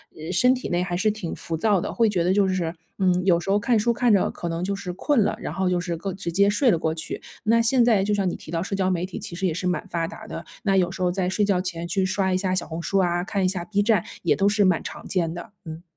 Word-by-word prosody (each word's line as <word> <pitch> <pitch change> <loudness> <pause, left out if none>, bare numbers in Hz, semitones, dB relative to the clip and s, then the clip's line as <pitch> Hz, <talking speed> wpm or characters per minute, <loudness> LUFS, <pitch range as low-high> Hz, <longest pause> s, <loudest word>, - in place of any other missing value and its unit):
呃 160 +3 -6
身 250 +5 +4
体 255 - -4
内 175 +1 +1
还 175 -1 -3
是 215 +4 +2
挺 205 -6 -5
浮 165 - -4
躁 205 +2 +2
的， - - -4
会 225 -2 +3
觉 180 -4 0
得 180 - +2
就 200 -1 +3
是， 175 -3 -1 0.2
嗯， 180 -1 +2
有 175 -3 +4
时 185 - -6
候 200 - +4
看 235 +2 +2
书 235 +2 +2
看 240 0 +2
着， 195 - +3
可 170 - -5
能 165 +1 -3
就 200 +2 -1
是 195 -2 -5
困 265 - +1
了， - - 0
然 - - -5
后 190 0 0
就 180 -1 +1
是 175 -1 -3
个 190 +3 -4
直 175 -2 -5
接 200 +3 +4
睡 240 +6 +3
了 170 - +2
过 160 0 -1
去。 160 - -5 0.2
那 230 +1 +4
现 240 +2 +3
在 220 -5 +4
就 210 - 0
像 195 -3 +1
你 - - -4
提 155 - -11
到 165 - -1
社 195 - -3
交 190 -1 +1
媒 180 -1 0
体， 185 - -7
其 170 - -7
实 190 +2 -2
也 165 - -1
是 180 +2 -4
蛮 180 - -1
发 165 -1 -2
达 220 - -10
的， - - -7 0.2
那 195 -2 +2
有 180 -2 +2
时 190 0 -7
候 180 - +2
在 180 0 -1
睡 210 +2 +1
觉 190 -3 +1
前， 170 -2 -4
去 190 0 0
刷 190 0 0
一 185 - +2
下 185 -1 -1
小 185 - -2
红 165 +1 -5
书 195 +3 0
啊， 175 -1 +1
看 195 0 -1
一 - - +4
下 185 -2 -2
B 205 0 0
站， 210 -4 +3 0.2
也 - - +3
都 195 - +2
是 210 0 +2
蛮 180 -3 +2
常 - - -8
见 170 -4 0
的， 175 +3 -8
嗯。 160 +1 -7
185 Hz, 335 characters per minute, -24 LUFS, 175-205 Hz, 0.2 s, 身